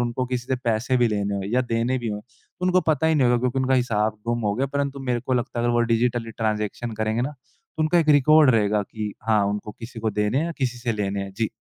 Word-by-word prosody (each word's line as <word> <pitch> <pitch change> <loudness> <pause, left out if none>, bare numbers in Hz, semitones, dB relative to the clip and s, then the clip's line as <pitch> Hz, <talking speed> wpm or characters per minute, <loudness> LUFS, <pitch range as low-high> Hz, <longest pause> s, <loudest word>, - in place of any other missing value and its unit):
उनको 120 +1 -1
किसी 125 0 -3
से 130 - 0
पैसे 120 +3 +1
भी 120 -2 +3
लेने 100 -1 -1
हो 100 - -3
या 130 - +4
देने 120 +2 0
भी 120 -2 -4
हों, 105 0 -3 0.4
उनको 185 0 +3
पता 160 +1 +2
ही 160 - +3
नहीं 135 -5 +3
होगा 120 0 +3
क्योंकि 125 +1 0
उनका 130 0 +2
हिसाब 110 -4 0
गुम 120 0 0
हो 100 - +1
गया। 135 +4 0
परंतु 140 -1 -1
मेरे 120 -1 0
को 130 +1 -3
लगता 120 -1 -2
है 120 - 0
अगर 120 - +2
वो 120 - +3
डिजिटली 115 0 0
ट्रांज़ैक्शन 110 +1 -2
करेंगे 110 +2 0
ना, 140 - -2 0.5
तो 155 - +1
उनका 170 +3 +3
एक 160 -2 +1
रिकॉर्ड 150 0 +6
रहेगा 105 -3 +2
कि 105 0 -5 0.2
हाँ, 105 -2 +4
उनको 105 +1 -3
किसी 115 0 -9
को 110 -1 0
देने 105 +5 0
है 160 - +1
या 170 - -3
किसी 125 -2 -1
से 120 -1 -1
लेने 100 -1 -2
है। 100 - -8
जी। 115 -2 0
120 Hz, 265 wpm, -24 LUFS, 110-130 Hz, 0.5 s, रिकॉर्ड